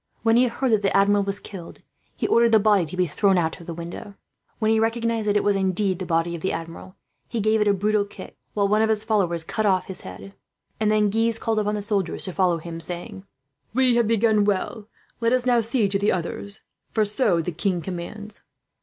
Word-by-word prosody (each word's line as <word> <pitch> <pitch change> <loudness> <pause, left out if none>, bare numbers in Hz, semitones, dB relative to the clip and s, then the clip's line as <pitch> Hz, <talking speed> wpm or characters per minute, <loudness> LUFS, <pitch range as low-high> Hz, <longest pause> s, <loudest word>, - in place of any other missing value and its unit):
When 225 0 +4
he 250 +1 +5
heard 250 +2 -1
that 215 -2 +3
the 195 -1 +2
Admiral 200 +1 +3
was 200 0 -1
killed, 185 -5 -10 0.3
he - - -3
ordered 235 0 +3
the 220 - +7
body 200 -5 +3
to 180 - -8
be 180 - +3
thrown 190 +4 +2
out 160 -2 -1
of 170 - -13
the 170 - -4
window. 170 +4 -8 0.4
When 220 -1 +1
he 220 - +3
recognized 230 -1 0
that 205 0 +3
it - - +1
was 205 -1 +2
indeed 190 -1 +1
the 185 - -5
body 165 0 0
of 165 - -8
the 190 - -1
Admiral, 165 +3 -7 0.3
he 235 - -2
gave 215 +1 +2
it 210 - +2
a 205 - +4
brutal 210 +2 +1
kick, 205 - -11 0.2
while 200 -1 +2
one 210 +2 +2
of 220 - +2
his 215 -1 +1
followers 190 -7 +1
cut 215 +5 -1
off 185 -2 +2
the 190 -2 -8
head; 195 - -10 0.5
and 215 -1 +1
then 210 -1 +2
Guise 225 +1 +1
called 225 -1 -1
upon 210 0 -1
the 205 - -3
soldiers 200 -5 0
to 185 - -5
follow 180 -2 +2
him, 165 0 -7
saying: 175 +3 -6 0.5
"We 260 -1 +4
have 235 -2 +2
begun 220 -1 +3
well. 205 +2 -2 0.3
Let 230 +1 +1
us 255 -1 +1
now 245 -2 +3
see 225 -1 +1
to 195 0 +1
the 205 - +2
others, 195 +3 -4 0.3
for 215 -1 +1
so 210 -4 +1
the 165 +2 -2
king 175 +2 -1
commands." 190 +5 -7
205 Hz, 235 wpm, -23 LUFS, 185-220 Hz, 0.5 s, the